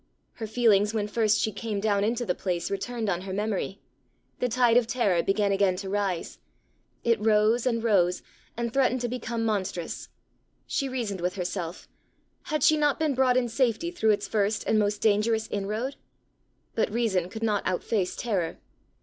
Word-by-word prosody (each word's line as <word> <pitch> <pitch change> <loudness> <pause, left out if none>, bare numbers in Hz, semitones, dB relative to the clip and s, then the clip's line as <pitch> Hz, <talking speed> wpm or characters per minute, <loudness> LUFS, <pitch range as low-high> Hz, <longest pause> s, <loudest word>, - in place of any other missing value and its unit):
Her 225 - -6
feelings 215 -2 +3
when 210 -1 0
first 215 -1 +2
she 220 - 0
came 210 0 -3
down 200 -1 +1
into 235 +3 0
the 180 - +1
place 175 -1 -3
returned 225 +3 -3
on 180 -3 0
her 190 0 -6
memory. 200 -1 -2 0.6
The 250 - 0
tide 240 0 +3
of 245 -2 +4
terror 205 -8 +2
began 200 +2 +1
again 195 -1 +2
to 190 +1 -5
rise. 195 -4 -2 0.6
It 230 -2 +2
rose 220 +3 +3
and 230 -2 0
rose, 180 -5 +2 0.3
and 235 -1 -2
threatened 260 -2 +2
to 240 - 0
become 235 -1 -3
monstrous. 190 -5 -3 0.6
She 275 - -1
reasoned 225 -8 -3
with 180 +2 -1
herself: 180 -2 -4 0.6
had 305 -4 -1
she 310 - +5
not 295 -2 +2
been 310 -3 +1
brought 255 -1 +3
in 250 -1 +2
safety 250 +7 0
through 220 -11 +1
its 205 -1 +2
first 210 0 0
and 215 - +3
most 205 0 0
dangerous 220 +1 +2
inroad? 215 +7 -2 0.8
but 220 - 0
reason 205 -6 0
could 220 +3 -7
not 210 -2 +1
outface 185 +1 -1
terror. 190 -9 -2
215 Hz, 175 wpm, -27 LUFS, 200-235 Hz, 0.8 s, she